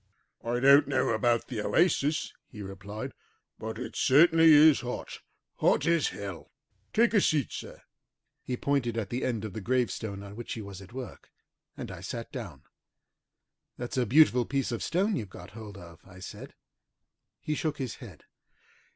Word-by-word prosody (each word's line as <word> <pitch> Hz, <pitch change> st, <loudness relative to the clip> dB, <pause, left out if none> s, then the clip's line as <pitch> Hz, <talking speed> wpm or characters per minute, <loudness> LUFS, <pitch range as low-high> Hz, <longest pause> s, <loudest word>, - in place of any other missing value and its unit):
"I 120 Hz, +1 st, -1 dB
don't 140 Hz, +2 st, +6 dB
know 135 Hz, -2 st, +1 dB
about 115 Hz, +1 st, +2 dB
the 115 Hz, -5 st, -4 dB
oasis," 155 Hz, -, +1 dB
he 105 Hz, -4 st, -9 dB
replied, 100 Hz, +2 st, -7 dB, 0.5 s
"but 110 Hz, 0 st, -5 dB
it 125 Hz, -, -6 dB
certainly 165 Hz, +3 st, +6 dB
is 150 Hz, 0 st, +7 dB
hot, 125 Hz, 0 st, -5 dB
as -, -, -9 dB, 0.4 s
hot -, -, +2 dB
as 165 Hz, -2 st, +3 dB
hell. 100 Hz, -3 st, -7 dB, 0.4 s
Take 230 Hz, +1 st, +3 dB
a 205 Hz, -, +5 dB
seat, 150 Hz, -, +1 dB
sir!" -, -, -8 dB, 0.6 s
He 125 Hz, -, -4 dB
pointed 130 Hz, -5 st, 0 dB
to 115 Hz, -2 st, -1 dB
the 120 Hz, +6 st, -4 dB
end 115 Hz, -4 st, -1 dB
of 105 Hz, -, -6 dB
the 110 Hz, -, -5 dB
gravestone 110 Hz, -3 st, -1 dB
on 100 Hz, 0 st, -10 dB
which 120 Hz, +1 st, -6 dB
he 115 Hz, -, -5 dB
was 100 Hz, -1 st, -9 dB
at 95 Hz, -, -13 dB
work, 130 Hz, -1 st, -8 dB, 0.5 s
and -, -, -6 dB
I -, -, -9 dB
sat -, -, -6 dB
down. -, -, -7 dB, 1.1 s
"That's 120 Hz, 0 st, -5 dB
a 125 Hz, -3 st, +1 dB
beautiful 125 Hz, -1 st, +5 dB
piece 135 Hz, -3 st, -1 dB
of 115 Hz, -, -3 dB
stone 195 Hz, +6 st, +1 dB
you've 105 Hz, -, -4 dB
got 90 Hz, +1 st, -11 dB
hold 110 Hz, -3 st, -10 dB
of," 85 Hz, -3 st, -12 dB
I 95 Hz, -1 st, -15 dB
said. 95 Hz, -, -9 dB, 0.8 s
He 150 Hz, -, -3 dB
shook 155 Hz, 0 st, -2 dB
his 130 Hz, -7 st, -4 dB
head. -, -, -12 dB
120 Hz, 175 wpm, -29 LUFS, 105-145 Hz, 1.1 s, is